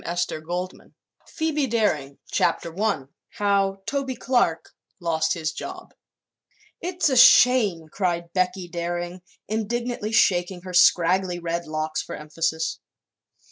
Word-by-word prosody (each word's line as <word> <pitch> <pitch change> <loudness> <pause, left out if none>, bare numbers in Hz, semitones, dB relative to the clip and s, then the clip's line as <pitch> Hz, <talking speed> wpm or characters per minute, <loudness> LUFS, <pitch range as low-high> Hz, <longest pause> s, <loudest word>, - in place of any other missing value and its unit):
Page 175 +1 -1
282 175 +4 -6 0.3
Phoebe 305 -3 -1
Daring 155 - 0
CHAPTER 165 - 0
I 205 -10 +1 0.3
HOW 200 -2 0
TOBY 275 -2 -2
CLARK 240 -12 0 0.3
LOST 160 -2 0
HIS 160 -2 -2
JOB - - -8 0.9
"It's 360 0 0
a 265 - +1
shame!" 235 -9 +6
cried 170 -1 -2
Becky 185 0 0
Daring, 175 +1 -4 0.3
indignantly 225 +1 -2
shaking 180 -4 +2
her 185 -1 -8
scraggly 180 +1 +4
red 170 0 -3
locks 155 0 -2
for - - -7
emphasis. 160 +1 -2
180 Hz, 115 wpm, -24 LUFS, 170-220 Hz, 0.9 s, shame